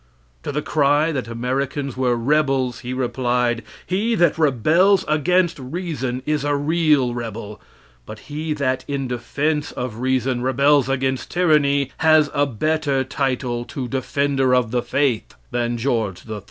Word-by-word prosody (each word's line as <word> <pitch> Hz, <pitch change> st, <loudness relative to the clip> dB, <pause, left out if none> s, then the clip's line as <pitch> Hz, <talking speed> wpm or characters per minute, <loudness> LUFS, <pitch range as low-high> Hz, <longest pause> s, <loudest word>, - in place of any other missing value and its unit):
To -, -, -4 dB
the 150 Hz, +1 st, -2 dB
cry 150 Hz, +2 st, +2 dB
that 130 Hz, -6 st, -3 dB
Americans 130 Hz, +3 st, -2 dB
were 125 Hz, -2 st, +1 dB
rebels, 135 Hz, 0 st, +1 dB
he 125 Hz, -, -6 dB
replied: 125 Hz, -2 st, 0 dB, 0.2 s
"He 215 Hz, +6 st, 0 dB
that 175 Hz, -5 st, +3 dB
rebels 165 Hz, -, +3 dB
against 170 Hz, +3 st, +2 dB
reason 135 Hz, -3 st, -4 dB
is 150 Hz, -2 st, 0 dB
a 145 Hz, 0 st, +1 dB
real 150 Hz, -4 st, +2 dB
rebel; 110 Hz, -3 st, -6 dB, 0.5 s
but 110 Hz, -, -8 dB
he 155 Hz, +1 st, -4 dB
that 130 Hz, -3 st, -1 dB
in 140 Hz, -2 st, -2 dB
defense 145 Hz, +5 st, -2 dB
of 125 Hz, -3 st, -5 dB
reason 130 Hz, -1 st, 0 dB
rebels 140 Hz, +2 st, +3 dB
against 130 Hz, -1 st, -1 dB
tyranny, 145 Hz, -6 st, +2 dB
has 155 Hz, -2 st, +4 dB
a 145 Hz, -1 st, +2 dB
better 140 Hz, +2 st, 0 dB
title 130 Hz, -3 st, -2 dB
to 130 Hz, 0 st, -5 dB
'Defender 135 Hz, +1 st, +1 dB
of 120 Hz, -3 st, +1 dB
the 125 Hz, 0 st, +1 dB
Faith' 135 Hz, -, -1 dB, 0.2 s
than 120 Hz, 0 st, -1 dB
George 115 Hz, -7 st, -2 dB
III." 110 Hz, -1 st, -5 dB
135 Hz, 145 wpm, -21 LUFS, 125-150 Hz, 0.5 s, has